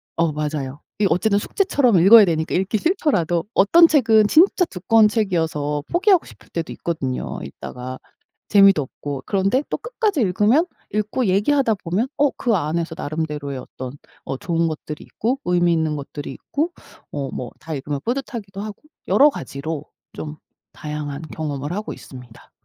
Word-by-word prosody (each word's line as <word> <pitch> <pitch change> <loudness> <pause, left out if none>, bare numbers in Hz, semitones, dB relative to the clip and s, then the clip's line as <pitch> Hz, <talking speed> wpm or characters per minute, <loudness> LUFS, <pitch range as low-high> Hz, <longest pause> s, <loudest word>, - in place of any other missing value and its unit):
어 165 -1 +1
맞아요. 150 -2 -4 0.2
이 210 - +3
어쨌든 200 +4 +2
숙제처럼 255 - +2
읽어야 210 +4 +9
되니까 160 -2 -1
읽기 190 +4 +1
싫더라도 205 - +1
어떤 330 - +6
책은 225 -8 +4
진짜 360 - +5
두꺼운 220 - +3
책이어서 160 -9 -1
포기하고 370 0 +4
싶을 - - -16
때도 165 -1 -4
있거든요 135 -7 -3
읽다가. 130 +1 -8 0.5
재미도 195 -5 +6
없고. 140 0 -6
그런데 200 +7 +1
또 - - -1
끝까지 435 - -1
읽으면 210 - +3 0.3
읽고 215 +4 0
얘기하다 220 +6 +2
보면 185 +9 0
어 290 0 +4
그 235 -3 +1
안에서 165 0 -2
나름대로의 150 -2 -4
어떤 130 0 -8 0.3
어 135 - -4
좋은 165 +1 0
것들이 150 -1 -7
있고 245 +5 -2
의미 175 -1 +2
있는 160 -2 0
것들이 145 0 -7
있고 315 +5 -3 0.4
어 140 -2 -3
뭐 125 - -5
다 160 - -7
읽으면 145 0 -3
뿌듯하기도 230 -6 -4
하고 210 -1 -7 0.3
여러 290 +2 +6
가지로 140 - -5 0.3
좀 155 0 -7 0.3
다양한 150 0 -6
경험을 145 0 -4
하고 210 +2 -4
있습니다. 125 -3 -13
175 Hz, 360 characters per minute, -21 LUFS, 150-225 Hz, 0.5 s, 읽어야